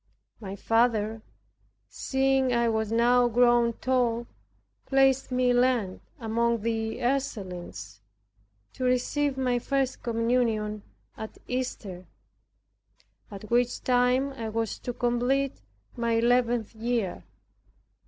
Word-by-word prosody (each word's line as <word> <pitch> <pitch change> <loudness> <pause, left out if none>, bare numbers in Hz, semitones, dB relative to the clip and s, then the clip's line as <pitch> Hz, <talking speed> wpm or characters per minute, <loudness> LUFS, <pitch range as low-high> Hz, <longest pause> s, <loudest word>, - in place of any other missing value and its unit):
My 195 -3 -6
father, 225 0 +1 0.7
seeing 265 - +1
I 235 -1 +2
was 220 -1 -1
now 240 +2 +4
grown 240 0 +3
tall, 240 -2 0 0.6
placed 270 -1 +3
me 250 0 +2
in 245 0 +4
Lent 240 -7 0 0.2
among 235 0 0
the 225 -1 -2
Ursulines, 180 - -3 0.7
to - - -6
receive 265 +3 +1
my 250 -2 +1
first 265 +1 -1
communion 230 -3 0 0.4
at 220 - -8
Easter, 210 -8 -4 1.2
at 210 +2 -10
which 245 0 +1
time 250 +2 +2
I 230 -4 -5
was 225 -1 -2
to 245 - -4
complete 245 - 0 0.3
my 235 -1 0
eleventh 235 -1 +2
year. 225 -3 -2
240 Hz, 105 wpm, -27 LUFS, 220-250 Hz, 1.2 s, now